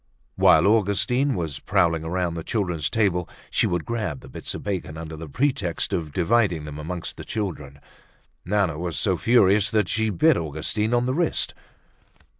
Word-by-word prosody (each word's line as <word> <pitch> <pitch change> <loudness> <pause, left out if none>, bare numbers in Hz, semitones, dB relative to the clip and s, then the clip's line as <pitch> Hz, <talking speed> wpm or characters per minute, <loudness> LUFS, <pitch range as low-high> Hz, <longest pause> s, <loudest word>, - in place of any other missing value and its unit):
While - - +5
Augustine 115 +6 +2
was 80 -6 -3
prowling 85 -2 +1
around 90 +1 -1
the 85 -1 -5
children's 90 - -1
table, 95 -6 0 0.2
she - - +2
would 90 -2 -2
grab 105 - -3
the - - -13
bits - - -5
of - - -7
bacon 90 -6 -4
under 80 -1 -7
the 80 0 -8
pretext 115 - -1
of 80 -5 -2
dividing 90 -2 +1
them 75 0 -7
amongst 85 +3 -5
the - - -7
children. 75 -10 -5 0.6
Nana 95 -5 0
was 85 -3 -3
so 90 +5 +2
furious 100 -1 +4
that 105 -3 +1
she 110 +3 +1
bit 155 - +3
Augustine 85 +9 -1
on 120 0 +2
the 130 - 0
wrist. 165 +2 0
90 Hz, 170 wpm, -24 LUFS, 80-110 Hz, 0.6 s, While